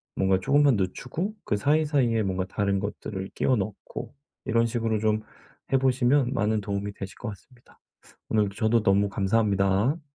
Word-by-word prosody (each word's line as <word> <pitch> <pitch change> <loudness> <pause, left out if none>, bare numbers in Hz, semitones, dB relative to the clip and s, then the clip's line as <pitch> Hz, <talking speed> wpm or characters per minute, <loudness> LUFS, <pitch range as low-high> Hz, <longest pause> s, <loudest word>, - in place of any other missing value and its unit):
뭔가 95 -1 +2
조금만 140 +5 +4
늦추고 125 - -3
그 - - 0
사이사이에 135 -2 +2
뭔가 95 -1 -1
다른 100 0 -1
것들을 95 -1 -5
끼워 130 - +2
넣고 105 -2 -5 0.3
이런 115 +1 +2
식으로 115 -2 -1
좀 110 0 +1 0.5
해 135 - +5
보시면 130 0 +2
많은 110 -3 +1
도움이 100 0 -3
되실 95 -1 -8
것 120 - -4
같습니다. 115 +5 -15 0.5
오늘 105 -2 +2
저도 110 +3 +1
너무 100 0 +3
감사합니다. 100 - +1
110 Hz, 340 characters per minute, -26 LUFS, 100-125 Hz, 0.5 s, 해